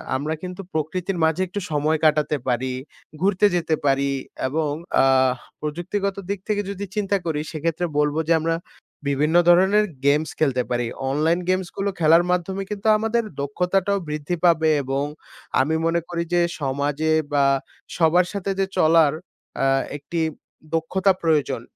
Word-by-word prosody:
আমরা 150 +4 -2
কিন্তু 180 +1 -6
প্রকৃতির 175 +4 -2
মাঝে 160 +3 +2
একটু 195 +3 -4
সময় 155 +1 +1
কাটাতে 150 -1 +3
পারি 130 +1 0 0.5
ঘুরতে 195 +1 +3
যেতে 165 -2 +1
পারি। 140 0 +2 0.4
এবং 150 +2 -1 0.3
আ - - +4 0.6
প্রযুক্তিগত 185 +6 -2
দিক 200 -1 -2
থেকে 210 -1 +1
যদি 200 0 -5
চিন্তা 200 -1 +1
করি। 160 -3 -1
সেক্ষেত্রে 165 +2 -2
বলব 150 0 +1
যে 165 - +4
আমরা 165 +1 0 0.5
বিভিন্ন 150 +3 +1
ধরনের 190 +4 +5 0.2
গেমস 150 +2 +3
খেলতে 130 -5 +2
পারি 120 -1 0 0.2
অনলাইন 155 +5 +1
গেমসগুলো 185 +2 -1
খেলার 165 +1 +5
মাধ্যমে 190 +2 -1
কিন্তু 205 +1 -3
আমাদের 225 +2 0 0.2
দক্ষতাটাও 180 +7 0
বৃদ্ধি 150 +3 -2
পাবে। 160 -2 +4
এবং 135 +1 -1 0.6
আমি 155 +4 +1
মনে 170 +1 +1
করি 170 -1 -2
যে 175 - +4 0.2
সমাজে 145 +3 0 0.2
বা 140 -1 +4 0.5
সবার 175 +2 +4
সাথে 200 -1 -2
যে 195 - +3
চলার 160 -3 +5 0.5
আ - - +3 0.3
একটি 155 +4 -5 0.6
দক্ষতা 185 +4 +2
প্রয়োজন 150 -7 +1
165 Hz, 145 wpm, -23 LUFS, 150-185 Hz, 0.6 s, ধরনের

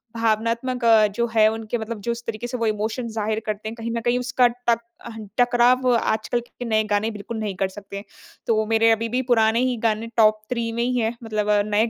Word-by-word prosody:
भावनात्मक 230 +3 0
अ, 220 -2 +6
जो 210 +4 -1
है 215 -1 +6
उनके 225 +1 -3
मतलब 220 -1 -5
जो 235 - -2
इस 235 0 -5
तरीके 230 +1 -4
से 250 +1 -4
वो 230 - -1
इमोशन 220 +3 -2
ज़ाहिर 215 0 -1
करते 215 0 -4
हैं, 225 - -8
कहीं 230 0 -5
न - - -2
कहीं 240 +2 +1
उसका 250 0 +3
टक 240 -1 0 0.3
अहन 220 -3 -8
टकराव 245 +1 +3
आजकल 225 +1 0
के 240 +1 -10
नए 220 -1 +2
गाने 205 +2 +1
बिल्कुल 215 +2 -7
नहीं 210 -3 -3
कर 195 - 0
सकते। 200 +1 -9 0.4
तो 220 -1 +2
मेरे 225 +1 +3
अभी 225 +1 0
भी 250 +2 0
पुराने 225 0 +4
ही 250 -2 -1
गाने 220 +1 -1
टॉप 215 -1 +4
3 235 -2 -2
में 235 +1 -1
ही 250 +1 0
हैं। 225 +1 -1
मतलब 215 -2 -2 0.2
नए 215 +2 +2
225 Hz, 220 wpm, -23 LUFS, 215-235 Hz, 0.4 s, अ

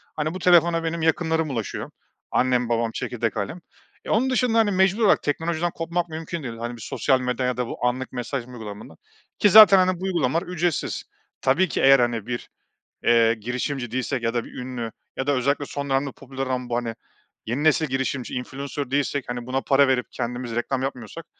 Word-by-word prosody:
Hani 155 +1 -2
bu 185 - -5
telefona 170 -1 +4
benim 165 0 -2
yakınlarım 160 0 +1
ulaşıyor. 115 -6 -4 0.4
Annem, 125 -1 +2
babam, 115 -1 0
çekirdek 115 -1 -3
ailem. 105 - -3 0.5
E - - -7
onun 250 +5 +2
dışında 250 -3 +2
hani 220 -2 +4
mecbur 190 +3 +2
olarak - - +4
teknolojiden 165 +3 -1
kopmak 170 +1 -2
mümkün 160 0 -5
değil. 115 -3 -6
Hani 120 +1 -5
bir 115 - -12
sosyal 130 +5 +1
medya 125 0 -1
ya 125 -1 -1
da 125 -1 -1
bu - - -4
anlık 125 +1 -1
mesaj 125 0 -4
uygulamalarından 110 -8 -9 0.4
ki 205 - +5
zaten 205 -1 +10
hani 185 -1 +2
bu - - -8
uygulamalar 170 -4 0
ücretsiz. 175 -3 -1 0.4
Tabii 165 +9 +3
ki - - -1
eğer 135 0 +7
hani 120 -3 0
bir, 120 -1 -4 0.6
eee, 115 -1 +5
girişimci 125 +3 -3
değilsek 130 +1 -2
ya 115 0 -1
da 120 - 0
bir - - -12
ünlü 125 -2 -5 0.3
ya 130 - -2
da 145 - +3
özellikle 140 +2 0
son 140 0 -5
dönemde 135 0 0
popüler 135 0 -6
ama 125 -1 -2
bu 120 - -1
hani 120 -2 -2 0.5
yeni 125 +7 -2
nesil 155 0 +4
girişimci, 130 -1 -2
influencer 140 +2 -5
değilsek 140 0 0
hani 120 -1 -4
buna 130 +1 -1
para 140 0 +4
verip 125 -2 +1
kendimiz 120 0 -4
reklam 130 +2 -1
yapmıyorsak 135 +4 -6
135 Hz, 195 wpm, -24 LUFS, 120-160 Hz, 0.6 s, zaten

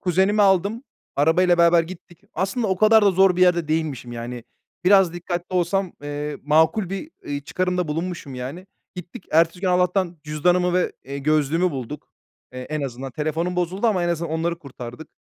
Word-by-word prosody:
kuzenimi 190 +3 +2
aldım, 200 +5 +2 0.3
arabayla 175 +4 +3
beraber 170 0 +5
gittik. 175 0 -12
Aslında 195 +6 -1
o 190 -1 0
kadar 215 +1 +5
da 200 - +5
zor 190 -1 +4
bir - - -1
yerde 175 -3 +3
değilmişim 150 -6 -2
yani. 120 0 -6 0.4
Biraz 190 -2 +5
dikkatli 175 +1 -5
olsam, 180 +1 0
eee, 145 0 -4
makul 160 +6 +2
bir, 195 +11 -5
iii, 145 0 -4
çıkarımda 180 -1 -1
bulunmuşum 165 -3 -4
yani. 140 +10 -7 0.3
Gittik, 180 +1 -10
ertesi 165 +3 +3
gün 190 - 0
Allah'tan 180 -1 +1
cüzdanımı 175 +4 +1
ve, 180 - +1
eee, 140 +1 -6
gözlüğümü 155 +4 +1
bulduk. 135 +1 -7 0.4
Eee, 130 - -7
en 150 +4 -4
azından 130 0 -5
telefonum 160 +6 -2
bozuldu 185 +6 0
ama 190 -5 +2
en - - 0
azından 170 -1 -2
onları 170 +1 -1
kurtardık. 130 -1 -10
170 Hz, 170 wpm, -22 LUFS, 150-185 Hz, 0.4 s, beraber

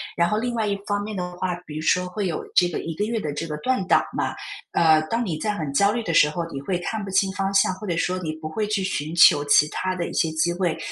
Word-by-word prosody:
然 170 0 +2
后 210 - 0
另 240 +2 -2
外 225 -2 -1
一 200 - 0
方 205 0 -1
面 210 -1 -5
的 180 -1 -3
话， 180 -1 -1
比 150 - -9
如 155 - -3
说 180 +3 +2
会 190 +2 -3
有 170 - -3
这 175 -1 +5
个 170 - -4
1 165 - -5
个 185 - -2
月 225 +1 -2
的 150 -8 -4
这 165 +3 -4
个 150 -1 -4
断 255 +5 0
档 - - +4
嘛， - - -1 0.4
呃， 160 -2 +5
当 235 +1 0
你 170 -6 -2
在 215 - -1
很 155 -7 -4
焦 200 +8 +4
虑 235 +1 -2
的 165 - -2
时 150 - +6
候， 170 +2 -3
你 135 - -5
会 180 +5 -1
看 210 +4 -4
不 195 - -6
清 190 0 +2
方 195 0 -2
向， 195 0 +4
或 190 +3 -9
者 170 -2 -1
说 180 +2 0
你 165 -4 -3
不 155 0 -7
会 210 +7 -2
去 205 -2 -1
寻 160 -4 -3
求 145 -3 +7
其 145 +1 +5
它 185 +4 -2
的 175 -2 -3
一 - - -7
些 160 - +1
机 165 +2 +1
会。 175 -3 -1
180 Hz, 315 characters per minute, -23 LUFS, 160-205 Hz, 0.4 s, 求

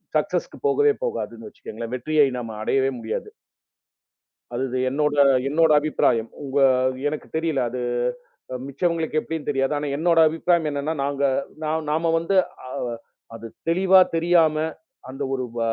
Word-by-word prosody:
சக்ஸெஸ் - - 0 0.2
போகவே 435 0 +3
போகாது 470 - -3
வச்சுங்கங்களேன். 115 +2 -8
வெற்றியை 150 +3 +2
நம்ம 115 -2 -6
அடையவே 135 +3 +2
முடியாது. 110 -1 -4 1.3
அதுது 130 +1 -2
என்னோட 145 +2 0 0.3
என்னோட 160 +2 +3
அபிப்பிராயம். 115 -6 +1
உங்க 140 0 -1 0.5
எனக்குத் 155 +1 -5
தெரியல 160 -5 0
அது 125 +1 -4 0.7
அ - - -3
மிச்சவங்களுக்கு 160 +2 -1
எப்படின்னு 160 -2 -5
தெரியாது. 135 0 0
ஆனா 145 0 -3
என்னோட 165 +1 +3
அபிப்பிராயம் 165 0 +1
என்னன்னா 145 +2 -2
நாங்க 140 0 -2 0.4
நா 155 - -1 0.2
நாம 165 +2 +1
வந்து 170 +4 -1 0.3
அ - - -8 0.7
அது 115 0 -8 0.2
தெளிவா 190 +2 +5 0.2
தெரியாம 165 -2 +3 0.5
அந்த 135 +2 -5
ஒரு 130 -1 -1
ப - - -1
150 Hz, 135 wpm, -23 LUFS, 135-165 Hz, 1.3 s, தெளிவா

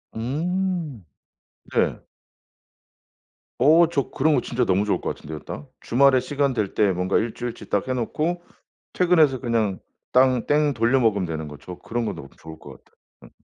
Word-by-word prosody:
음 160 - -2 0.7
네. - - 0 1.6
어 160 +5 +6
저 140 -5 -1
그런 150 +2 +2
거 125 - +2
진짜 125 0 -1
너무 95 +2 +2
좋을 105 - 0
것 - - -3
같은데요 75 0 -8
딱. 70 - -8
주말에 130 +1 +4
시간 140 +1 -1
될 105 -5 -2
때 105 -2 +3
뭔가 90 +1 0
일주일치 120 +1 -4
딱 100 +4 0
해 130 - 0
놓고 155 +8 -2 0.5
퇴근해서 160 -8 +3
그냥 115 -6 0 0.3
땅 130 -1 +3
땡 145 -1 +2
돌려 120 +3 +2
먹으면 105 -6 +2
되는 80 -2 -5
거 75 -1 -9
저 90 +4 -9
그런 120 0 -3
거 - - -2
너무 - - -9
좋을 80 0 -11
것 - - -13
같아요. - - -33 0.3
응. - - -15
125 Hz, 290 characters per minute, -23 LUFS, 105-145 Hz, 1.6 s, 어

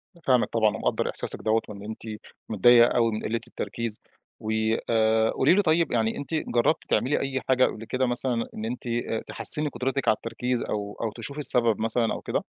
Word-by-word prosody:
أنا 170 - -20
فاهمِك 125 -2 +3
طبعًا 110 -2 +1
ومقدر - - -1
إحساسِك - - -1
دوّة 110 +1 +1
وإن 100 -1 -9
أنتِ 110 +1 -8 0.5
متضايقة 120 +3 +6
أوي 115 -1 +3
من 110 - -4
قِلة 115 +2 -1
التركيز، 115 -2 -5 0.4
و 110 - -4 0.4
آآ. 110 0 +3
قولي 135 +6 +3
لي 205 - +4
طيب 165 -3 +1
يعني 115 -2 0
أنتِ 145 +3 -7
جربتِ 140 -1 +1
تعملي 140 +4 +1
أي 135 -1 -2
حاجة 130 0 +4
قبل 115 - -5
كده 130 +3 -1
مثلًا 120 -1 -1
إن 110 - -5
أنتِ 120 +2 -5 0.4
تحسِّني 150 0 +3
قدرتِك 135 0 -3
على 110 - +5
التركيز 125 +2 -3
أو 105 -1 -4
أو 115 -2 -2
تشوفي 140 +6 -5
السبب 120 -5 +2
مثلًا 115 +1 0
أو - - -6
كده؟ - - -2
120 Hz, 190 wpm, -25 LUFS, 110-130 Hz, 0.5 s, متضايقة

